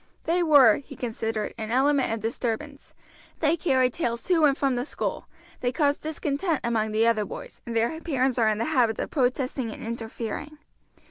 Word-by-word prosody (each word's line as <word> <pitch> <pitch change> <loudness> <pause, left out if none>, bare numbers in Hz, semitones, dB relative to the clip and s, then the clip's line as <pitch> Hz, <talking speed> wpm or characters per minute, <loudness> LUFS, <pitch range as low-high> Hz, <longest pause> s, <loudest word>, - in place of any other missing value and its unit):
They 345 +2 +1
were, 285 -10 +6
he 280 - -11
considered, 225 -3 -3
an 220 -1 -4
element 270 +2 +2
of 225 -1 -2
disturbance; 240 +5 -4 0.4
they 315 +1 +3
carry 260 -7 +2
tales 235 -6 -2
to 340 -4 +3
and 280 -1 +3
from 270 -2 +1
the 245 - -1
school; 290 - -4 0.3
they 245 - 0
cause 285 +1 +1
discontent 310 +1 -2
among 220 -2 0
the 220 +1 +2
other 230 -2 +3
boys, - - -9
and 235 - -4
their 235 +9 0
parents 260 -6 0
are 220 -2 +4
in 215 - 0
the 230 - -1
habit 245 -8 +2
of - - -4
protesting 255 -2 0
and - - -8
interfering. 230 +6 -5
255 Hz, 185 wpm, -26 LUFS, 225-295 Hz, 0.4 s, were